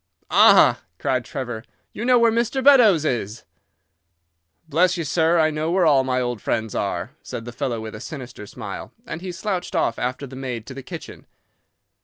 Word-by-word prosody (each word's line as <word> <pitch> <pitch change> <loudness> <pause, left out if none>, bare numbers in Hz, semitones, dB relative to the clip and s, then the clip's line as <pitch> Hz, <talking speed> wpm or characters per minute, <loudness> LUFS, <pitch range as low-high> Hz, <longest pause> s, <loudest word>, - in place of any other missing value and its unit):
"'Ah!' - - +6 0.2
cried 130 +4 -1
Trevor. 120 -5 -5 0.3
'You 220 - -5
know 250 0 +5
where 235 -1 +4
Mr. 235 +3 0
Beddoes 225 - +6
is?' 115 -5 -2 1.2
"'Bless 170 +4 +2
you, 170 - -2
sir, 160 +2 +2
I 155 -1 +3
know 155 +1 -2
where 180 0 +2
all 140 -4 +5
my 130 -1 0
old 120 -4 -3
friends 110 -1 -2
are,' - - -2
said 115 - -7
the 120 - -6
fellow 120 0 -3
with 110 0 -7
a 105 - -8
sinister 125 -5 -8
smile, - - -8
and 165 - -6
he 185 -1 -5
slouched 190 0 -4
off 140 -8 0
after 125 +3 -3
the 130 -1 -11
maid 125 -4 -5
to 135 - -9
the 135 - -8
kitchen. - - -10
140 Hz, 185 wpm, -22 LUFS, 120-180 Hz, 1.2 s, Ah